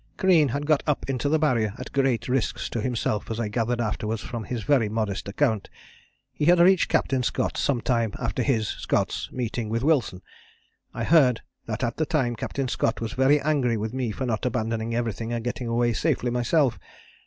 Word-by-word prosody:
"Crean 175 -6 +4
had 140 +4 -2
got 155 -1 +3
up 150 - 0
into 135 +2 -1
the 160 - +3
Barrier 115 -9 +1
at - - -8
great 135 -4 +1
risks 130 -2 -1
to 115 - -3
himself 115 -3 -1
as 115 0 -3
I 110 -3 -1
gathered 120 +2 -1
afterwards 110 -1 -2
from 115 -3 -5
his 120 -1 -4
very 125 -5 +2
modest 105 -3 -2
account. 110 -1 0 0.6
He 150 - -1
had 175 +2 +6
reached 180 +1 +5
Captain 130 -1 +1
Scott 125 - -1
some 130 -4 0
time 115 -4 0
after - - -2
his 115 -5 +1
[Scott's] - - -2
meeting 120 -2 -3
with 115 +2 -1
Wilson. 135 - +1 0.7
I - - -4
heard 135 -8 +4 0.3
that 115 +2 -3
at 120 0 -1
the 155 - 0
time 130 -8 0
Captain 135 +3 -3
Scott 115 -2 0
was 115 -1 -4
very 135 +3 +4
angry 135 -6 +1
with 110 +2 -3
me 130 -3 -1
for 130 +5 -3
not 110 -3 -2
abandoning 115 -2 -1
everything 115 -1 -2
and 115 -1 -3
getting 120 0 -3
away 120 0 +1
safely 120 +2 0
myself. 125 +3 +1
120 Hz, 195 wpm, -25 LUFS, 115-135 Hz, 0.7 s, had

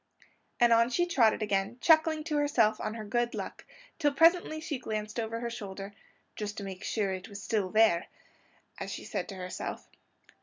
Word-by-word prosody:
_" - - -24 0.3
And 240 -1 +6
on 230 +1 +4
she 350 +8 +2
trotted 235 -11 +3
again 200 +2 -1
chuckling 315 +1 +4
to 305 -1 -1
herself 235 -7 +2
on 215 - -3
her 220 -2 -6
good 240 +3 0
luck, - - -6 0.3
till 295 -3 +3
presently 330 +2 +4
she 310 -4 -4
glanced 215 -1 -4
over 230 0 -3
her 235 - -2
shoulder, 200 -2 -7 0.4
"just 210 0 -5
to 200 - -4
make 190 -1 -7
sure 200 -4 -1
it 185 +2 -7
was 200 -1 -8
there 220 -2 +2 0.5
still," - - -26
as - - -5
she - - -6
said 200 0 -4
to 195 - -6
herself. 180 -1 -6
225 Hz, 190 wpm, -30 LUFS, 205-290 Hz, 0.5 s, And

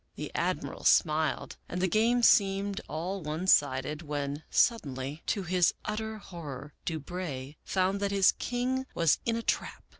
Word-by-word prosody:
The - - -6
Admiral - - -2
smiled 155 -3 +2
and 180 - -3
the 185 - +2
game 230 +5 +2
seemed 200 -2 +4
all 180 +5 -3
one 155 +3 -3
sided, 145 -3 +3
when, 145 -1 -3
suddenly, 140 - +1
to 200 - 0
his 180 0 +2
utter 220 +1 -3
horror, 150 -7 -8
Du 160 -2 -2
Brey 145 -4 -6
found 190 +1 0
that 200 0 0
his 195 -1 +5
king 255 +2 -2
was 165 -3 +3
in 230 - +1
a 230 - -3
trap. - - -2
180 Hz, 155 wpm, -29 LUFS, 150-200 Hz, -, his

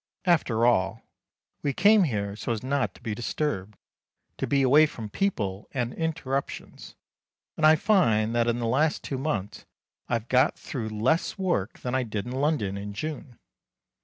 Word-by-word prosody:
After 125 -10 +2
all, 110 -2 +2 0.6
we 140 - -1
came 205 +3 +5
here 100 -7 -2
so 115 - -4
as 115 -1 -3
not 135 0 -1
to - - -17
be 110 -3 -2
disturbed 105 -4 -3 0.6
to - - -2
be 140 -1 +2
away 145 +4 +6
from 110 -7 -8
people 105 - -2
and 125 -2 -1
interruptions; 155 -5 -4 0.6
and 155 - +4
I 155 - +7
find 115 - +2
that 120 0 +2
in 120 0 +1
the 120 - -2
last 145 +7 +1
two 135 - -4
months 105 -9 -3 0.5
I - - -1
have 115 0 -1
got 130 +1 +3
through 120 -9 -5
less 115 - 0
work 175 - -1
than 125 - -3
I 130 - +2
did 110 -3 -4
in 125 - -6
London 130 -8 0
in 100 +1 -6
June. 145 +1 -6
125 Hz, 170 wpm, -26 LUFS, 110-150 Hz, 0.6 s, I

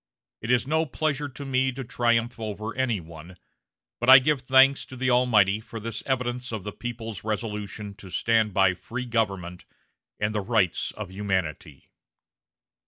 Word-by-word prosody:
It 115 - -6
is 125 -1 +3
no 160 +3 +1
pleasure 145 0 -2
to 140 +2 -9
me 130 0 +1
to 135 +1 -6
triumph 120 +1 0
over 110 0 -5
any 125 -5 0
one, 85 +2 -12 0.6
but 120 - +1
I 130 - +12
give 135 +1 +2
thanks 135 +2 +5
to 130 - -10
the 130 0 0
Almighty 110 -5 +4
for 115 +1 -9
this 115 0 -5
evidence 125 -1 -2
of 110 -4 -4
the 105 - -5
people's 115 -3 -6
resolution 105 -1 -4
to 95 - -11
stand 110 +2 +1
by 95 -1 +3
free 115 +8 -6
government 100 -7 -2 0.5
and 105 +1 0
the 105 - -1
rights 100 -4 +1
of - - -7
humanity." 95 -6 -3
115 Hz, 165 wpm, -26 LUFS, 100-125 Hz, 0.6 s, I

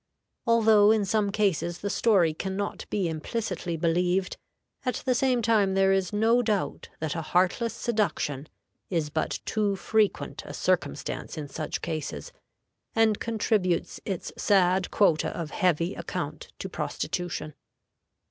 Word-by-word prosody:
Although 220 -3 +6
in 215 -2 +3
some 205 0 +1
cases 190 -5 0
the 200 - -2
story 190 -8 +3
can 190 +4 -4
not 200 0 -4
be 195 -4 0
implicitly 175 +1 -3
believed, 180 +3 +1 0.5
at 250 - -2
the 255 - +3
same 250 -1 +2
time 210 -4 +3
there 195 0 +4
is 190 -2 0
no 225 +3 +3
doubt 215 -4 -1
that 155 -2 -2
a 165 - -2
heartless 185 +8 +1
seduction 200 - -1 0.4
is 160 -5 -1
but 155 - -2
too 210 -2 0
frequent 215 +1 0
a - - -7
circumstance - - -1
in 150 -2 -4
such 155 +2 -4
cases, 155 - -4 0.6
and 225 -2 +3
contributes 210 -6 0
its 190 -4 -4
sad 185 -2 +3
quota 165 -7 +3
of 160 -3 -4
heavy 180 -2 +1
account - - -5
to - - -5
prostitution. 170 -4 -3
195 Hz, 140 wpm, -27 LUFS, 170-215 Hz, 0.6 s, Although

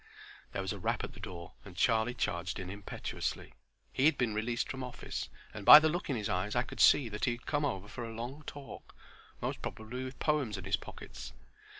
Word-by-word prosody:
There - - -2
was - - -2
a - - -7
rap - - 0
at - - -5
the - - -12
door, 85 -2 -7
and 95 -4 -12
Charlie 115 +3 +3
charged 85 -6 -1
in 95 -1 -5
impetuously. 100 0 -4 0.4
He 130 - +2
had 155 -2 +5
been 120 -4 +1
released 115 +3 -1
from 130 -1 -5
office, 125 -1 -5 0.2
and 110 - -7
by 150 - +13
the 155 +1 +5
look 175 +1 -3
in 135 - +1
his 105 -3 -2
eyes 95 +2 -1
I 120 - +3
could - - -10
see 135 - +7
that 105 0 -2
he 125 - +2
had 120 - -10
come 145 0 0
over 95 -7 -2
for 120 +3 -6
a 115 - -5
long 125 +6 -5
talk; 145 -1 -9 0.5
most - - -2
probably 120 +4 -5
with 130 0 -7
poems 145 - +1
in - - -7
his - - +2
pockets. - - -9
120 Hz, 225 wpm, -32 LUFS, 105-135 Hz, 0.5 s, by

